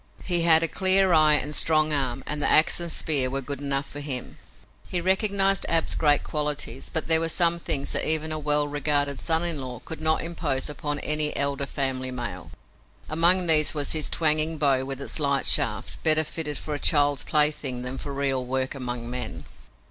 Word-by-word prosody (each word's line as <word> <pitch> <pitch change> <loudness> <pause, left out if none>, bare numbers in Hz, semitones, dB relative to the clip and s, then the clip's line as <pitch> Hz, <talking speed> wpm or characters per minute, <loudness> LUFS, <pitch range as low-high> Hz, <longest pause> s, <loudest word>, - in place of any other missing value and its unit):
He 175 -2 0
had 165 -1 +5
a - - +3
clear 190 +1 +2
eye 155 -1 +6
and 150 0 -2
strong 155 0 +2
arm, 135 -2 -2
and 150 0 -4
the - - +1
ax 155 - +4
and 170 -1 -5
spear 140 -6 +1
were 135 +1 -3
good 140 +1 -7
enough 140 -1 -2
for 145 - -9
him! 135 -4 -6 0.5
He 180 - -2
recognized 195 +1 +1
Ab's 165 -1 +1
great 145 -2 +2
qualities, 145 -4 -3
but 160 - -1
there 160 -1 +6
were 165 0 -2
some 170 0 +1
things 145 -5 -2
that - - +1
even 155 0 +2
a 155 - -2
well 150 0 +1
regarded 145 -1 -1
son 165 0 0
in 165 -5 -3
law 125 -2 -7
could 160 -1 -8
not 160 0 +1
impose 155 -5 -3
upon 145 0 -3
any 150 0 +1
elder 140 0 -1
family 130 -2 -3
male. 120 -9 -6 0.6
Among 175 +3 +4
these 155 -2 +4
was 145 -1 -2
this 155 -1 -1
twanging 155 0 0
bow 135 -3 +1
with 135 0 -6
its 140 - -2
light 140 -2 0
shaft, - - 0
better 155 0 +4
fitted 155 -1 -4
for 150 - -6
a 145 - -4
child's 145 -3 +2
plaything 150 -5 +1
than 125 +1 -5
for 145 - -6
real 135 -2 -1
work 130 +1 -2
among 125 -3 -4
men. 125 -1 -5
150 Hz, 200 wpm, -24 LUFS, 135-160 Hz, 0.6 s, eye